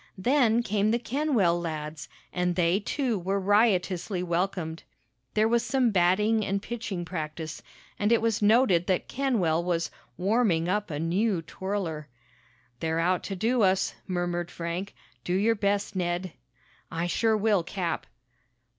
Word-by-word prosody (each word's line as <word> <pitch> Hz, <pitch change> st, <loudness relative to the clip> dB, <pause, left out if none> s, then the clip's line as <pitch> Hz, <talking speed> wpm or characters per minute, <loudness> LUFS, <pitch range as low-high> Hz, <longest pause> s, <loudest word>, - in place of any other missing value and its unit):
Then 240 Hz, +2 st, +3 dB
came 210 Hz, -1 st, +1 dB
the 230 Hz, -, +3 dB
Kenwell 240 Hz, -, +1 dB
lads, 155 Hz, -2 st, -5 dB, 0.2 s
and 180 Hz, 0 st, 0 dB
they, 175 Hz, +2 st, +2 dB
too, 235 Hz, 0 st, -1 dB
were 195 Hz, +3 st, -1 dB
riotously 190 Hz, -2 st, +2 dB
welcomed. 170 Hz, -2 st, -2 dB, 0.5 s
There 215 Hz, +1 st, +4 dB
was 235 Hz, +1 st, +3 dB
some 250 Hz, -1 st, +2 dB
batting 210 Hz, +4 st, +3 dB
and 195 Hz, 0 st, -1 dB
pitching 210 Hz, -5 st, -5 dB
practice, 160 Hz, -2 st, -5 dB, 0.4 s
and 210 Hz, +2 st, +2 dB
it 235 Hz, -, +5 dB
was 225 Hz, -2 st, 0 dB
noted 205 Hz, -5 st, +4 dB
that 185 Hz, -2 st, 0 dB
Kenwell 200 Hz, -12 st, +1 dB
was 170 Hz, -2 st, -1 dB, 0.3 s
"warming" 185 Hz, -4 st, +2 dB
up 210 Hz, +3 st, 0 dB
a 150 Hz, -, -3 dB
new 175 Hz, +3 st, 0 dB
twirler. 170 Hz, -4 st, -4 dB, 0.7 s
"They're 160 Hz, 0 st, -1 dB
out 180 Hz, +2 st, +2 dB
to 195 Hz, -, -4 dB
do 230 Hz, +6 st, +1 dB
us," 190 Hz, -1 st, +2 dB
murmured 175 Hz, -1 st, -2 dB
Frank. 170 Hz, +4 st, -5 dB, 0.3 s
"Do 175 Hz, -, -2 dB
your 215 Hz, +4 st, +3 dB
best, 205 Hz, -1 st, -1 dB
Ned!" 175 Hz, -1 st, -2 dB, 0.6 s
"I 165 Hz, +1 st, -2 dB
sure 220 Hz, +5 st, +2 dB
will, 210 Hz, -3 st, +2 dB
Cap!" 170 Hz, 0 st, -3 dB
190 Hz, 145 wpm, -27 LUFS, 175-220 Hz, 0.7 s, it